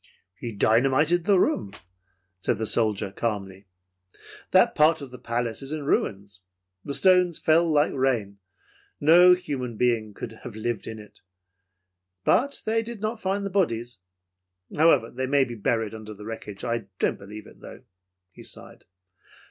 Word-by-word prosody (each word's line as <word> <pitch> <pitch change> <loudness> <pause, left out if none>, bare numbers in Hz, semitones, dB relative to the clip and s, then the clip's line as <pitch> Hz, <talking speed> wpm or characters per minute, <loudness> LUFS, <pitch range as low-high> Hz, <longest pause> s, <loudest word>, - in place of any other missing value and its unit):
"He 120 +5 -7
dynamited 135 +11 +2
the 200 -3 +4
room," 100 - 0 0.7
said - - 0
the 110 - -2
soldier 105 -3 +1
calmly. 100 -3 -4 0.8
"That - - +4
part 155 +2 +4
of 140 -3 -9
the 125 - -10
palace 115 0 -3
is 135 +1 -5
in 155 -2 -4
ruins. 100 -8 -1 0.4
The 140 - -2
stones 180 +2 +4
fell 165 +2 +3
like 150 -1 +2
rain. 120 -7 -1 0.6
No 175 +4 +7
human 130 -10 -5
being 115 -4 0
could 110 -1 -8
have 120 -4 -9
lived 110 0 -3
in 110 - -6
it. 105 -1 -15 1.0
But 275 +8 +1
they 225 +1 +1
did 230 -1 -8
not 220 +2 -3
find 195 +1 -1
the 200 - -4
bodies. 120 - -1 0.8
However, 145 -7 +4
they 130 +1 -3
may 140 0 +3
be 120 - -7
buried 110 0 -1
under 110 -1 -9
the 105 +1 -11
wreckage. 105 -3 -8
I 115 -3 -2
don't - - 0
believe 105 +2 -10
it, - - -16
though." - - -12 0.5
He - - -14
sighed. - - -10
120 Hz, 155 wpm, -25 LUFS, 110-160 Hz, 1.0 s, No